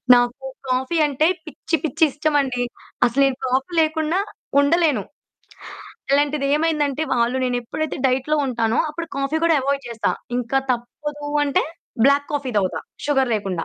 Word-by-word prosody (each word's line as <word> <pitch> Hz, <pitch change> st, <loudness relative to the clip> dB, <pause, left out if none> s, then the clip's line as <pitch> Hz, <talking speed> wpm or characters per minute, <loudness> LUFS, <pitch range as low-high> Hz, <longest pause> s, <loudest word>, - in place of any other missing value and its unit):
నాకు 245 Hz, +2 st, 0 dB, 0.2 s
కాఫీ 260 Hz, +6 st, 0 dB
అంటే 290 Hz, +3 st, +2 dB, 0.2 s
పిచ్చి 320 Hz, +1 st, -2 dB
పిచ్చి 320 Hz, +2 st, 0 dB
ఇష్టమండి. 280 Hz, -4 st, 0 dB, 0.4 s
అసలు 260 Hz, +4 st, 0 dB
నేను 265 Hz, -1 st, -2 dB
కాఫీ 265 Hz, +7 st, 0 dB
లేకుండా 315 Hz, +3 st, +1 dB, 0.4 s
ఉండలేను. 310 Hz, 0 st, +2 dB, 1.1 s
అలాంటిదేమైందంటే, 295 Hz, +1 st, +1 dB
వాళ్ళు 240 Hz, +1 st, +1 dB
నేనెప్పుడైతే 250 Hz, +5 st, -2 dB
డైట్‌లో 265 Hz, +4 st, +1 dB
ఉంటానో 230 Hz, -1 st, 0 dB
అప్పుడు 335 Hz, +2 st, -5 dB
కాఫీ 275 Hz, +3 st, 0 dB
కూడా 330 Hz, -1 st, +4 dB
ఎవాయిడ్ 275 Hz, 0 st, -1 dB
చేస్తా. 230 Hz, -1 st, -1 dB, 0.3 s
ఇంక 245 Hz, -1 st, -4 dB, 0.2 s
తప్పదు 290 Hz, +5 st, -4 dB, 0.2 s
అంటే, 280 Hz, -, +2 dB, 0.4 s
బ్లాక్ 280 Hz, +1 st, +3 dB
కాఫీ 280 Hz, -3 st, -2 dB
దాగుతా 190 Hz, -2 st, -1 dB, 0.3 s
షుగర్ 270 Hz, -4 st, +2 dB
లేకుండా. 190 Hz, -5 st, -2 dB
275 Hz, 130 wpm, -22 LUFS, 250-300 Hz, 1.1 s, కూడా